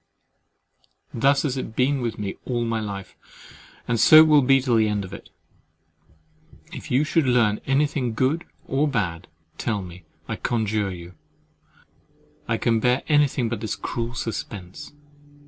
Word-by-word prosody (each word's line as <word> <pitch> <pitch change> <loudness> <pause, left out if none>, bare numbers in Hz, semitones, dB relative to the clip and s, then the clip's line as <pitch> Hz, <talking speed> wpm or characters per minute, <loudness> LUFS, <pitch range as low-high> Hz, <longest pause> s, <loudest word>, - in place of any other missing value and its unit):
Thus 135 +4 +2
has 135 -3 -1
it 110 -3 -6
been 130 +2 +1
with 115 -2 -3
me 100 -2 -4
all 120 -2 -2
my 115 -1 -1
life; 100 -3 -6 0.7
and 115 -2 0
so 155 +6 +9
will 155 -2 +5
it 130 - 0
be 135 0 +6
to 125 -2 +1
the 110 -1 +3
end 105 -2 -2
of 95 - -11
it!—If 155 - -16
you 135 +2 +2
should 155 -2 +1
learn 115 -4 +2
anything, 135 -3 0
good 135 +8 0 0.2
or 140 +3 0
bad, 95 - -2 0.3
tell 105 -4 -2
me, 90 -1 -12 0.2
I - - -4
conjure 110 -3 -1
you: 85 0 -10 1.3
I 115 - 0
can 115 0 +1
bear 125 +3 +1
anything 145 -5 +2
but 115 +1 -3
this 110 -4 -3
cruel 115 +4 -4
suspense. 100 -5 -6
120 Hz, 150 wpm, -23 LUFS, 105-135 Hz, 1.3 s, so